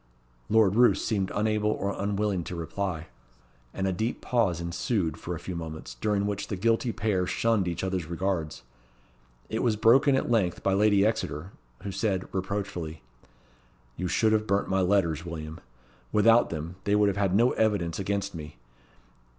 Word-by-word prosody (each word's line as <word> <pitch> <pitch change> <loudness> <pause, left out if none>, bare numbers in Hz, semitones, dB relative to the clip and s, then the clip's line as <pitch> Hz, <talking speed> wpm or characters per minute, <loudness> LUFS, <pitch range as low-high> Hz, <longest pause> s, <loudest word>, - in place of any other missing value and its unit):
Lord 110 -3 +4
Roos 125 0 +4
seemed 100 -4 -1
unable 105 0 +1
or 100 -2 -1
unwilling 100 -2 -1
to 90 - -5
reply; 85 0 -3 0.7
and 95 - -3
a 95 - +1
deep 110 +6 -2
pause 105 -9 +1
ensued 85 - -1
for 90 +1 -5
a - - -6
few 90 +1 -6
moments, 80 -2 -6
during 105 -2 0
which 100 -1 -3
the 100 - -3
guilty 115 +4 +1
pair 100 -5 0
shunned 115 -5 +1
each 85 0 -3
other's 95 -4 -2
regards. 85 -4 -2 0.8
It 110 - -2
was 115 -3 +2
broken 130 +6 +5
at 130 - 0
length 100 -7 +1
by 95 - +2
Lady 100 0 +4
Exeter, 90 -5 -2 0.3
who 100 - -4
said, 95 -2 -1
reproachfully, 95 -4 -4 0.9
"You 90 +6 -3
should 110 +4 +2
have 110 0 +1
burnt 100 +1 +1
my 95 0 +2
letters, 90 -5 +1
William. 80 -2 -7 0.5
Without 115 +3 +5
them, 85 +3 -5
they 100 0 +2
would 105 0 +4
have 100 -1 0
had 100 -2 +1
no 120 +4 +4
evidence 100 -7 0
against 100 0 -2
me. 75 -5 -8
100 Hz, 165 wpm, -27 LUFS, 85-105 Hz, 0.9 s, broken